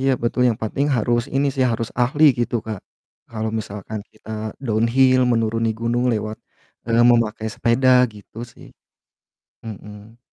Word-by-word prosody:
Iya 135 +1 +2
betul, 120 +1 0
yang 115 -2 -1
pating 140 +6 -1
harus 120 +1 +1
ini 140 +1 +2
sih, 130 - +1
harus 115 0 -3
ahli 145 +5 +2 0.2
gitu 120 - -2
Kak, 110 -4 -5 0.5
kalau 110 -1 -3
misalkan 105 0 -6
kita 110 0 -14 0.4
downhill 125 +4 +3
menuruni 115 0 0
gunung 120 +1 0
lewat, 110 0 -3 0.5
eee, 115 0 +3
memakai 115 -2 +1
sepeda, 125 +2 +4
gitu 105 +1 -14
sih. - - -15 1.0
Hmm. 105 +1 -11
115 Hz, 140 wpm, -21 LUFS, 110-120 Hz, 1.0 s, sepeda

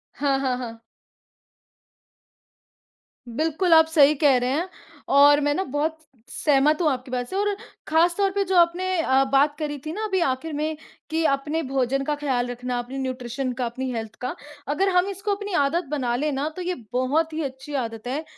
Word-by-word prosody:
हाँ, 275 -1 +1
हाँ, 255 -2 0
हाँ। 230 -2 -7 2.5
बिल्कुल, 320 +7 +1
आप 320 0 +8
सही 300 -2 +5
कह 275 -4 +5
रहे 250 +1 0
हैं 330 +6 -1 0.5
और 290 +1 +7
मैं 290 0 +2
ना 380 - 0
बहुत 300 +3 -2 0.3
सहमत 300 +2 +2
हूँ 315 - +3
आपकी 255 0 -5
बात 245 -1 -2
से 380 - -5
और 410 0 +1 0.3
ख़ासतौर 345 +5 +3
पे 400 0 0
जो 375 0 -1
आपने 345 +2 +3 0.2
अ, 265 -2 +3
बात 290 +2 +3
करी 295 -1 -3
थी 310 - -3
ना 430 +3 -4
अभी 380 -3 0
आखिर 295 +5 -3
में 305 +1 -2 0.3
कि 320 +1 0
अपने 295 +4 0
भोजन 270 0 0
का 295 +1 -1
ख़्याल 260 -4 -1
रखना, 245 0 -3
अपनी 250 +3 -6
न्यूट्रिशन 255 0 -3
का, 250 -1 -2
अपनी 260 +3 -4
हेल्थ 225 -1 -5
का, 250 - -3 0.3
अगर 340 +7 +1
हम 360 +2 +4
इसको 400 +1 -2
अपनी 410 -1 -6
आदत 310 +4 +2
बना 250 -5 0
लें 300 +4 0
ना 280 +2 -1
तो 365 - -5
ये 360 0 -2 0.2
बहुत 300 +6 +1
ही 320 - -2
अच्छी 270 +2 -7
आदत 225 +1 -7
है, 285 +5 -2
290 Hz, 190 wpm, -24 LUFS, 260-325 Hz, 2.5 s, आप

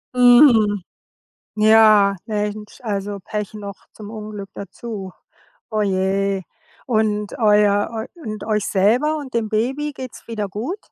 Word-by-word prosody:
Mhm. 240 -5 +6 0.8
Ja, 215 -2 +6
Mensch, 210 0 -4
also 205 -2 -3
Pech 210 -1 -4
noch 200 -2 -8
zum 210 -1 -10
Unglück 210 -2 -8
dazu. 200 -1 -7 0.6
Oh, 215 -1 0
je. 195 0 0 0.4
Und 215 -3 0
euer 210 -2 +3 0.3
eu 335 - -14
und 215 -3 -6
euch 210 -1 0
selber 240 +11 +2
und 275 -3 -8
dem 225 -2 0
Baby 265 +7 -1
geht's 255 -3 -9
wieder 210 -3 -3
gut? 245 - -4
210 Hz, 125 wpm, -20 LUFS, 205-230 Hz, 0.8 s, Mhm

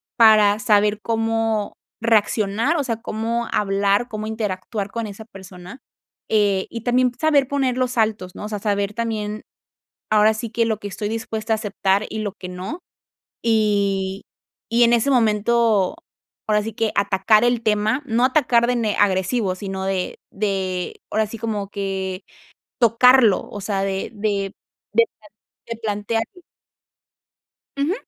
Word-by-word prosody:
para 215 -2 +6
saber 210 0 +3
cómo 225 -1 -1 0.3
reaccionar, 225 +5 +2
o 295 - 0
sea, 230 -4 -3
cómo 230 +2 -2
hablar, 200 +2 +1
cómo 215 -1 -5
interactuar 210 -1 -4
con 230 -1 -3
esa 210 +2 -9
persona, 190 +1 -12 0.5
eh, 205 -3 +2
y 230 - -6
también 250 +2 +2
saber 295 -4 +3
poner 265 -3 0
los 255 -1 -1
altos, 215 -5 0
¿no? - - -7
O - - -5
sea, 210 -1 -4
saber 200 -1 -1
también, 215 -2 -3 0.7
ahora 215 0 +5
sí 220 +1 -5
que 230 +1 +1
lo 220 -2 -1
que 205 - -8
estoy 205 +1 -4
dispuesta 225 0 -3
a - - 0
aceptar 200 -1 0
y 220 - -4
lo 205 -2 -3
que 185 -3 -9
no, 185 - -6 0.6
y 200 -3 +1 0.5
y 235 +1 +3
en 235 - +4
ese 235 +3 +2
momento, 225 -2 +2 0.5
ahora 210 -1 +2
sí 225 0 -6
que 225 -1 -1
atacar 205 +2 +3
el 240 -1 +2
tema, 215 +4 +1
no 240 -1 +1
atacar 255 -4 +3
de 245 0 +1
ne 220 -3 0
agresivo, 190 +1 +1
sino 190 0 -5
de 190 -1 -2
de 190 -3 -2
ahora 220 +1 +1
sí 225 +2 -8
como 210 -3 -3
que 195 -1 -4 0.6
tocarlo, 235 -2 +5
o 205 - -7
sea, 195 -1 -1
de 195 0 -2
de 200 -2 -2 0.4
de 230 +1 +5
pla 210 - -18 0.4
de 230 - -5
plantearlo. 225 - -3 1.4
Ujú, 285 +5 +1
215 Hz, 150 wpm, -21 LUFS, 200-230 Hz, 1.4 s, para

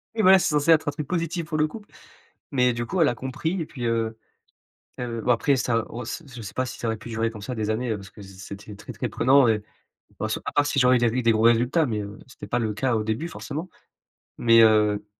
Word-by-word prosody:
Oui, 220 - +1
voilà, 190 -1 +7
c'est - - 0
censé 150 +2 +2
être 155 -2 +4
un - - +2
truc 145 0 -6
positif 170 0 -2
pour 160 -2 -2
le 155 0 +2
couple, 205 +6 -11 0.6
mais 125 -3 +3
du 120 0 -3
coup, 180 +8 -1
elle 155 - +5
a 120 - -2
compris, 160 - -3
et - - -3
puis, 125 -5 -6
heu 115 -1 -1 0.8
heu, 120 -2 -3
bon, 125 - 0
après 135 +4 +2
ça, 115 -3 0
on 120 - -6
s 120 +8 -6
je 120 - -8
sais 105 - -8
pas 130 - -1
si - - -8
ça 115 - -3
aurait 110 - -1
pu 110 +2 -11
durer 115 0 -1
comme 110 -2 -10
ça, 125 +5 -4
des 110 -2 -2
années, 115 +3 -1
heu, 110 - 0
parce 100 -1 -11
que - - -15
c'est 95 -1 -12
c'était 100 +1 -9
très - - -10
très - - -3
prenant 135 +1 +4
et 105 -2 +1 0.6
bon, - - -1
c - - -2
à - - -3
part 145 - +3
si 145 - 0
j'aurais 125 0 +5
eu - - -1
des 120 - +3
ri 120 +3 0
des 115 - +4
gros 110 0 +1
résultats 120 +8 +4
mais 110 -2 -2
heu, 100 +1 -8
c'était 130 - -11
pas 120 - 0
le 110 -3 -1
cas 120 +3 0
au 110 - 0
début, 110 +9 -2
forcément. 165 +1 -6 0.7
Mais 115 -1 +6
heu, 105 -2 +3
120 Hz, 275 wpm, -24 LUFS, 110-145 Hz, 0.8 s, voilà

